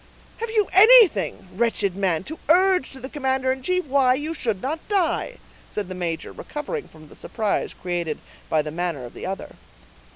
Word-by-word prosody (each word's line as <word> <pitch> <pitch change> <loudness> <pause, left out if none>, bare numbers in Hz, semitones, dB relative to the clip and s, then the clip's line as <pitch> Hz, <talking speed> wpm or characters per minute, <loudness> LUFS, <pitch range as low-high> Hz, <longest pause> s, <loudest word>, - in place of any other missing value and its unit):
'" - - -27
"Have 460 0 -3
you 430 -2 +2
anything, 385 - +6
wretched 205 -3 0
man, 185 -5 0
to 315 +10 -8
urge 365 -3 +4
to 265 - -10
the 260 - -6
commander 265 -2 0
in 265 0 -3
chief 365 +5 0
why 265 -2 +3
you 300 +4 -3
should 225 - -2
not 290 +9 -3
die?" 395 +5 0 0.3
said 205 -3 -4
the - - -4
major, 170 -3 -3
recovering 415 +10 -6
from 155 -1 -16
the - - -16
surprise 215 -3 -2
created 175 -4 -3 0.3
by 155 -1 +2
the 150 - -5
manner 165 -5 -3
of 120 - -11
the - - -7
other. 190 +1 -6
260 Hz, 190 wpm, -23 LUFS, -, 0.3 s, anything